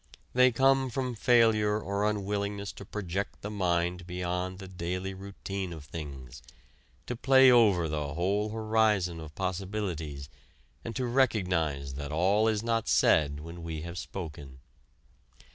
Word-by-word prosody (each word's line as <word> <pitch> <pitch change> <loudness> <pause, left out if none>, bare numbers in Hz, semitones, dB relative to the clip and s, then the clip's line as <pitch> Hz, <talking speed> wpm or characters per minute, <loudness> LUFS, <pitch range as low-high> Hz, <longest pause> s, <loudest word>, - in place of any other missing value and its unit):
They 125 0 +6
come 135 +2 +3
from 125 +1 -2
failure 110 -3 +3
or 100 +1 0
unwillingness 100 -1 -2
to 100 - -11
project 100 -1 -4
the 105 - -4
mind 90 -2 0
beyond 90 +1 -3
the 95 0 -9
daily 90 +1 -4
routine 95 -1 -6
of 80 -4 -8
things, 70 -5 -8 0.6
to 125 - -4
play 130 +1 +6
over 105 -9 +5
the 75 -1 -3
whole 100 +5 0
horizon 110 -5 +1
of 80 -1 -10
possibilities, 90 -7 -3 0.6
and 115 - -6
to 130 - -1
recognize 90 - +1
that 70 +2 -5
all 95 +7 +3
is 110 -1 0
not 115 -1 0
said 75 -1 +3
when 85 +2 -9
we 80 -2 -5
have 85 +1 -6
spoken. 75 -8 -7
95 Hz, 140 wpm, -29 LUFS, 85-110 Hz, 0.6 s, They